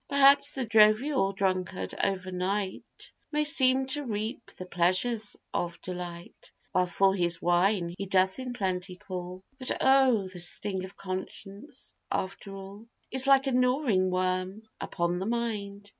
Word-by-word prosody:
Perhaps 280 Hz, 0 st, +5 dB
the 265 Hz, -2 st, -2 dB
jovial 215 Hz, +1 st, +4 dB
drunkard 190 Hz, -1 st, -2 dB
over 185 Hz, -1 st, -1 dB
night, 185 Hz, +2 st, -3 dB, 0.2 s
May 300 Hz, 0 st, +1 dB
seem 265 Hz, -2 st, +3 dB
to 290 Hz, +3 st, 0 dB
reap 220 Hz, 0 st, -4 dB
the 185 Hz, -, -7 dB
pleasures 185 Hz, +6 st, 0 dB, 0.2 s
of 170 Hz, -1 st, -2 dB
delight, 175 Hz, -1 st, -8 dB, 0.2 s
While 180 Hz, 0 st, +2 dB
for 190 Hz, +2 st, +3 dB
his 175 Hz, -3 st, 0 dB
wine 175 Hz, 0 st, +2 dB
he 195 Hz, +1 st, -5 dB
doth 190 Hz, +3 st, +2 dB
in 255 Hz, -1 st, -4 dB
plenty 185 Hz, -4 st, -2 dB
call; 180 Hz, 0 st, -7 dB, 0.2 s
But 255 Hz, -, -2 dB
oh! 265 Hz, -7 st, +4 dB
the 185 Hz, -1 st, -9 dB
sting 190 Hz, +2 st, -2 dB
of 190 Hz, +1 st, -12 dB
conscience, 195 Hz, +7 st, -6 dB, 0.2 s
after 195 Hz, +1 st, -4 dB
all, 195 Hz, +3 st, -10 dB, 0.2 s
Is 265 Hz, +1 st, +3 dB
like 270 Hz, 0 st, +6 dB
a 270 Hz, -, 0 dB
gnawing 250 Hz, -6 st, +2 dB
worm 185 Hz, +3 st, -1 dB, 0.2 s
upon 175 Hz, 0 st, -1 dB
the 190 Hz, -, -3 dB
mind. 210 Hz, -4 st, -3 dB
195 Hz, 145 wpm, -28 LUFS, 185-245 Hz, 0.2 s, like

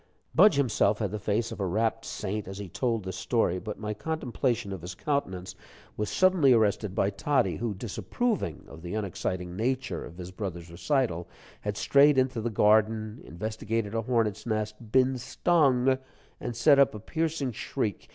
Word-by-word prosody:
Budge 185 Hz, 0 st, +6 dB
himself 115 Hz, -6 st, +2 dB
had 105 Hz, -3 st, -2 dB
the 105 Hz, -, -3 dB
face 110 Hz, +3 st, -1 dB
of 115 Hz, -, -7 dB
a 100 Hz, -, 0 dB
rapt 110 Hz, +4 st, 0 dB
saint 105 Hz, 0 st, -4 dB
as 95 Hz, 0 st, -7 dB
he 100 Hz, -1 st, -6 dB
told 115 Hz, +3 st, -1 dB
this 95 Hz, 0 st, -4 dB
story, 95 Hz, -5 st, +1 dB
but 105 Hz, +2 st, -6 dB
my 105 Hz, 0 st, -3 dB
contemplation 120 Hz, -6 st, -2 dB
of 95 Hz, -, -6 dB
his 90 Hz, +2 st, -7 dB
countenance 95 Hz, -10 st, -2 dB, 0.4 s
was 105 Hz, -, -2 dB
suddenly 185 Hz, -8 st, +4 dB
arrested 105 Hz, -3 st, +1 dB
by 100 Hz, -, +2 dB
Toddie, 130 Hz, +5 st, +1 dB
who, 115 Hz, -3 st, -2 dB
disapproving 110 Hz, -, -2 dB
of 80 Hz, -3 st, -12 dB
the 85 Hz, +4 st, -5 dB
unexciting 90 Hz, -3 st, -3 dB
nature 120 Hz, -3 st, -1 dB
of 85 Hz, -, -11 dB
his 90 Hz, 0 st, -7 dB
brother's 90 Hz, -4 st, -6 dB
recital, 95 Hz, -, 0 dB, 0.3 s
had 105 Hz, -1 st, -4 dB
strayed 140 Hz, 0 st, +5 dB
into 130 Hz, -3 st, +1 dB
the 120 Hz, -, -1 dB
garden, 110 Hz, +1 st, +2 dB
investigated 110 Hz, +4 st, -3 dB
a 115 Hz, -, 0 dB
hornet's 115 Hz, -3 st, 0 dB
nest, 110 Hz, 0 st, -3 dB
been 130 Hz, 0 st, +3 dB
stung, 130 Hz, -2 st, +2 dB, 0.4 s
and 120 Hz, -, -4 dB
set 140 Hz, +4 st, +5 dB
up 140 Hz, -5 st, +4 dB
a -, -, -6 dB
piercing 160 Hz, +2 st, -2 dB
shriek. 115 Hz, -2 st, -3 dB
110 Hz, 170 wpm, -28 LUFS, 100-130 Hz, 0.4 s, Budge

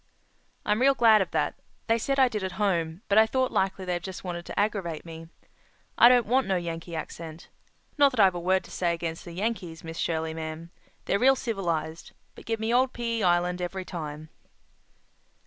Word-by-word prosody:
"I'm 210 Hz, +3 st, +1 dB
real 275 Hz, +1 st, +5 dB
glad 225 Hz, -4 st, +6 dB
of 190 Hz, -, -1 dB
that. -, -, 0 dB, 0.3 s
They 230 Hz, 0 st, +2 dB
said 275 Hz, +4 st, -1 dB
I 265 Hz, -1 st, +6 dB
did 215 Hz, -5 st, -3 dB
at 190 Hz, -1 st, -3 dB
home, 175 Hz, -3 st, -1 dB
but 205 Hz, +2 st, +5 dB
I 220 Hz, -, +6 dB
thought 260 Hz, +2 st, 0 dB
likely 190 Hz, 0 st, 0 dB
they 180 Hz, -1 st, -1 dB
just 185 Hz, +2 st, -8 dB
wanted 175 Hz, -2 st, -5 dB
to -, -, -4 dB
aggravate 195 Hz, -7 st, -1 dB
me. 165 Hz, 0 st, -9 dB, 0.7 s
I 240 Hz, -, +8 dB
don't 245 Hz, -2 st, +4 dB
want 255 Hz, +4 st, +2 dB
no 190 Hz, -, +1 dB
Yankee 170 Hz, -1 st, -4 dB
accent. 160 Hz, 0 st, -7 dB, 0.5 s
Not 285 Hz, -1 st, +7 dB
that 245 Hz, -, -4 dB
I've 190 Hz, -3 st, +6 dB
a 175 Hz, -, -4 dB
word 185 Hz, +2 st, +1 dB
to -, -, -14 dB
say 170 Hz, -2 st, 0 dB
against 165 Hz, -1 st, -5 dB
the 175 Hz, -, -8 dB
Yankees, 185 Hz, -4 st, -3 dB
Miss 165 Hz, 0 st, -7 dB
Shirley, 160 Hz, -1 st, -1 dB
ma'am. 160 Hz, +1 st, -6 dB, 0.3 s
They're 200 Hz, -, +1 dB
real 270 Hz, +2 st, +5 dB
civilized. 170 Hz, -9 st, -3 dB, 0.2 s
But -, -, -14 dB
give 225 Hz, -1 st, -1 dB
me 220 Hz, +2 st, -1 dB
old 255 Hz, +1 st, +3 dB
P.E. 230 Hz, -2 st, -2 dB
Island 180 Hz, -1 st, +2 dB
every 185 Hz, +1 st, -4 dB
time." 155 Hz, -3 st, -7 dB
185 Hz, 200 wpm, -27 LUFS, 165-225 Hz, 0.7 s, I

